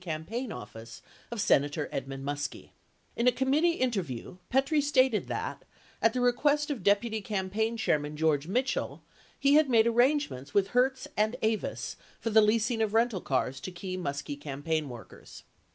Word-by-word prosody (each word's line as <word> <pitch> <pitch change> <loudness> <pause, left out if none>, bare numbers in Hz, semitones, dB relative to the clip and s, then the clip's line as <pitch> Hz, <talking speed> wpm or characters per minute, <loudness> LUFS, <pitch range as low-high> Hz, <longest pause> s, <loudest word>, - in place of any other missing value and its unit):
campaign 185 +9 -4
office 115 - -9 0.3
of 235 -2 -5
Senator 145 -6 +2
Edmund 135 0 -5
Muskie. 145 0 -4 0.4
In 235 - +1
a - - +7
committee 285 +7 +2
interview 190 - -3
Petrie 275 +4 +2
stated 260 -6 +2
that, - - -4 0.4
at 225 - +4
the 250 - -1
request 290 +5 +2
of 270 - -4
Deputy 215 +3 +2
Campaign 210 +3 -1
Chairman 150 -7 0
George 155 -1 +1
Mitchell, 255 +7 -1 0.4
he 280 0 +4
had 305 -1 +5
made 225 -3 +5
arrangements 240 - +1
with 200 -1 +3
Hertz 260 +3 +1
and 215 +3 +1
Avis 220 -1 -2 0.2
for 225 - -2
the 220 +1 +7
leasing 225 +2 +2
of 220 -1 0
rental 225 -5 +2
cars 135 0 -1
to 160 - -6
key 185 +1 -5
Muskie 140 -4 -4
campaign 150 +1 -2
workers. 120 -2 -11
215 Hz, 155 wpm, -29 LUFS, 150-250 Hz, 0.4 s, a